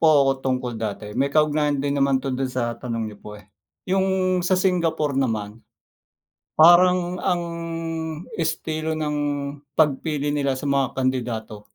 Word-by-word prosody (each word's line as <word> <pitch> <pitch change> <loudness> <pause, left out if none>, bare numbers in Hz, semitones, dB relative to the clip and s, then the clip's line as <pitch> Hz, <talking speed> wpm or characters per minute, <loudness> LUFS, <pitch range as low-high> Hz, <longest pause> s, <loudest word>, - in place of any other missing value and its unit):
po 165 - +4 0.2
ako 135 - +4
tungkol 130 -2 -1
dati 105 -1 -4
may 140 +1 +1
kaugnayan 150 -1 +2
din 140 +1 -1
naman 135 -1 +3
'to 130 -1 -3
dun 130 0 -1
sa 120 -2 -2
tanong 115 -2 -4
niyo 100 - -15
po, 105 0 -9
eh. 95 - -19 0.4
Yung 190 -1 +1
sa 185 +1 +2
Singapore 165 -6 +1
naman, 110 -3 -2 1.0
parang 175 +2 +6
ang, 175 -2 +1 0.9
estilo 160 -1 -2
ng 150 -1 -1 0.6
pagpili 150 -1 +1
nila 140 -2 0
sa 145 - -5
mga 140 -1 +2
kandidato. 120 -5 -2
140 Hz, 145 wpm, -23 LUFS, 125-165 Hz, 1.0 s, parang